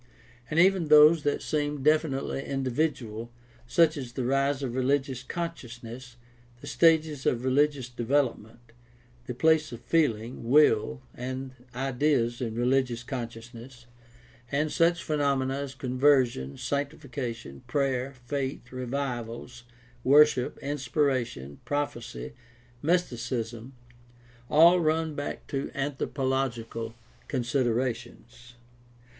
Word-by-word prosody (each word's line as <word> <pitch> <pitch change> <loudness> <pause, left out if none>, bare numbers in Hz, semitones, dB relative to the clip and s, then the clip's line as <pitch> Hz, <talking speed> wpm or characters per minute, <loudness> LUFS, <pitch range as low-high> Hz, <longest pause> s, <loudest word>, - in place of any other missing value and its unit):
and 155 - +1
even 185 -2 +4
those 150 +2 +7
that 145 0 -1
seem 145 -2 -2
definitely 150 -3 +1
individual, 130 -4 -2 0.4
such 165 +3 +4
as 125 -4 -6
the 130 -2 -3
rise 135 +1 +1
of 125 -3 -3
religious 130 0 0
consciousness, 125 -6 -7 0.4
the 145 - -11
stages 155 -2 +2
of 125 +1 0
religious 140 -1 +2
development, 120 -2 -2 0.6
the 125 - -4
place 160 +2 +3
of 120 - -7
feeling, 120 -6 0
will, 110 - +4
and 130 +1 -5 0.2
ideas 130 -2 0
in 115 -3 -3
religious 125 -1 +1
consciousness, 120 -1 -8 0.7
and 150 +2 0
such 170 0 +2
phenomena 140 -3 0
as 140 -1 -4
conversion, 125 - +2
sanctification, 140 - -4
prayer, 135 -2 0
faith, 135 -2 -4
revivals, 125 -2 -5 0.4
worship, 140 -2 +5
inspiration, 130 - -1
prophecy, 120 - -4 0.5
mysticism, 125 -7 -2 0.7
all 170 +4 +7
run 160 -1 +1
back 145 0 -5
to 135 0 -3
anthropological 130 -5 -2 0.3
considerations. 120 -1 -2
130 Hz, 100 wpm, -28 LUFS, 120-145 Hz, 0.7 s, those